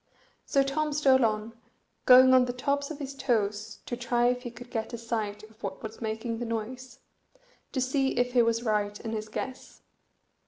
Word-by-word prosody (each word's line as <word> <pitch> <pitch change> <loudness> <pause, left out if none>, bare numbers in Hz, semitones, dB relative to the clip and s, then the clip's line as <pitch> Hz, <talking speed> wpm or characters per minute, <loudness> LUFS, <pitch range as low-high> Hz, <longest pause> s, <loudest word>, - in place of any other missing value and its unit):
So 275 - +3
Tom 300 +2 -1
stole 270 -3 +4
on, 215 0 0 0.5
going 255 +1 +9
on 255 -1 +6
the 245 - -3
tops 280 +3 -1
of 310 - -6
his 280 -1 -6
toes 215 -6 -1
to 240 - -3
try 240 0 +1
if 250 0 -1
he 245 - -6
could 240 +1 -12
get 225 +1 -3
a - - -3
sight 220 -3 -3
of 220 +1 -16
what - - -5
was 220 +2 -8
making 225 +1 -3
the - - -3
noise, 240 +3 -5 0.7
to 270 - -2
see 265 0 0
if 245 0 +1
he 245 - +6
was 230 0 +1
right 210 -2 0
in 225 - -5
his 215 -1 -4
guess. 260 +4 -7
240 Hz, 195 wpm, -28 LUFS, 220-260 Hz, 0.7 s, going